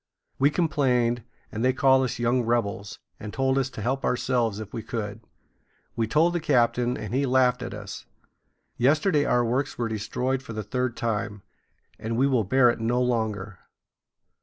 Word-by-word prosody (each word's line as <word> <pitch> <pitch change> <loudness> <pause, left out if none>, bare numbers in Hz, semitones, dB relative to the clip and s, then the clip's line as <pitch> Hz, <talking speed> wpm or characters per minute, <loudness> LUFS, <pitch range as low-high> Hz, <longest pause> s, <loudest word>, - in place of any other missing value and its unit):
We 140 +2 +5
complained, 125 -7 +1 0.3
and 115 -1 -3
they 130 0 +3
called 130 0 +4
us 125 - -3
young 120 +2 +2
rebels, 110 -4 -1 0.2
and 105 -1 -7
told 135 +2 +1
us 135 -1 -1
to 110 - -7
help 135 +4 -1
ourselves 120 -4 0
if 105 -2 -8
we 115 - -3
could. 110 -2 -5 0.7
We 115 -1 0
told 160 +8 +3
the 175 - 0
captain, 125 -4 +2
and - - -6
he 135 +1 +1
laughed 125 -1 +3
at 120 -4 -5
us. 100 -2 -8 0.7
Yesterday 150 +4 +3
our 120 -1 +2
works 130 +4 -1
were 120 - -1
destroyed 125 +4 -2
for 120 -3 -9
the 110 -1 -4
third 125 +3 -2
time, 105 -3 -2 0.6
and 115 +1 -3
we 130 - +4
will 130 -5 +2
bear 125 +4 +4
it - - -6
no 115 +2 +1
longer." 110 -5 -1
120 Hz, 175 wpm, -26 LUFS, 110-130 Hz, 0.7 s, We